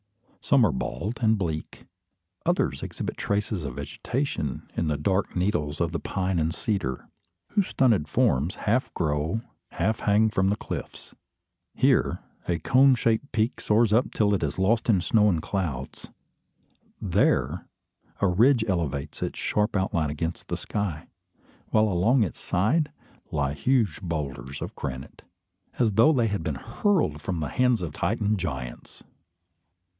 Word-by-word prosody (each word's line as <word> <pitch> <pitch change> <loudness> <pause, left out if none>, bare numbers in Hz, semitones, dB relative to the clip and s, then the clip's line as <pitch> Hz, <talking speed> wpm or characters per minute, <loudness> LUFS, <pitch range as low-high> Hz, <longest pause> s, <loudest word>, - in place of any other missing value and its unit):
Some 135 -5 +5
are 100 - +2
bald 70 - -4
and 110 -1 +3
bleak; 80 -5 -4 0.6
others - - +1
exhibit - - -4
traces 100 -3 -1
of 70 - -5
vegetation 75 - -3
in 85 - 0
the 75 -1 0
dark 95 +6 0
needles 90 -6 0
of 85 -1 0
the 85 - -2
pine 95 -2 -1
and 80 +1 +1
cedar, 85 - -2 0.4
whose 200 -3 +2
stunted 110 - +2
forms 70 +6 +1
half 115 +5 0
grow, 80 +5 0 0.3
half 110 +2 0
hang 105 +1 +3
from 95 -1 +2
the 100 - +2
cliffs. - - -7 0.6
Here, - - +3 0.3
a 85 - +1
cone 130 - +5
shaped 115 +3 0
peak 110 +3 0
soars 110 0 +3
up 120 +3 +3
till 105 -1 +2
it 100 - +1
is 75 -2 -2
lost 110 +5 +2
in 100 -5 +4
snow 105 +2 +4
and 85 -4 0
clouds. 75 -10 -4 0.9
There, - - +1 0.5
a 100 - +3
ridge 115 +6 +4
elevates 80 -7 -2
its - - -3
sharp 105 +1 0
outline 85 -5 0
against 80 +3 -4
the - - -2
sky; 95 -8 -3 0.6
while 110 0 +4
along 110 +7 +3
its 90 - -4
side, 125 - +1 0.4
lie 70 -2 -1
huge 110 - +1
boulders 70 -7 -4
of - - -7
granite, 65 -1 -6 0.6
as 115 -4 +2
though 115 +9 +6
they 120 -6 +2
had 100 -3 -2
been 80 -3 -2
hurled 115 - 0
from 90 -4 -3
the 75 -3 -2
hands 125 - +2
of 80 -4 -4
Titan 105 +6 0
giants! 65 -9 -6
95 Hz, 150 wpm, -26 LUFS, 75-110 Hz, 0.9 s, though